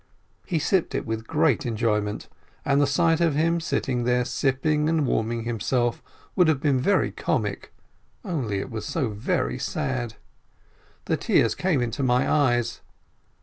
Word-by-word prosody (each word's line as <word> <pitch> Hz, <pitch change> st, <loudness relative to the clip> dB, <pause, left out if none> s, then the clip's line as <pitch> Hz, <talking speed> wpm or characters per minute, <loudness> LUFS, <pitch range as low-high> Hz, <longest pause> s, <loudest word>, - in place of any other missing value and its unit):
He 175 Hz, -, 0 dB
sipped 175 Hz, +3 st, +1 dB
it -, -, -2 dB
with 110 Hz, 0 st, -4 dB
great 150 Hz, -5 st, +2 dB
enjoyment. 105 Hz, -3 st, -1 dB, 0.4 s
And 140 Hz, +1 st, +3 dB
the 145 Hz, -, +3 dB
sight 165 Hz, +4 st, +2 dB
of 165 Hz, -4 st, +2 dB
him 165 Hz, +3 st, +2 dB
sitting 130 Hz, -6 st, -1 dB
there 125 Hz, 0 st, +1 dB
sipping 150 Hz, +4 st, 0 dB
and 160 Hz, -3 st, +2 dB
warming 115 Hz, -1 st, -1 dB
himself 120 Hz, +1 st, -1 dB, 0.3 s
would 180 Hz, -3 st, +4 dB
have 155 Hz, -4 st, +2 dB
been 140 Hz, -2 st, +2 dB
very 200 Hz, +11 st, +2 dB
comic, -, -, -2 dB, 0.5 s
only 135 Hz, -, -2 dB
it 100 Hz, -, -5 dB
was 110 Hz, -2 st, -4 dB
so 140 Hz, -8 st, -1 dB
very 100 Hz, -, -1 dB
sad. 120 Hz, -3 st, -3 dB, 0.9 s
The -, -, 0 dB
tears -, -, +2 dB
came 165 Hz, -9 st, 0 dB
into 120 Hz, +4 st, -3 dB
my 125 Hz, -1 st, +2 dB
eyes. 120 Hz, -6 st, +1 dB
130 Hz, 150 wpm, -25 LUFS, 115-155 Hz, 0.9 s, would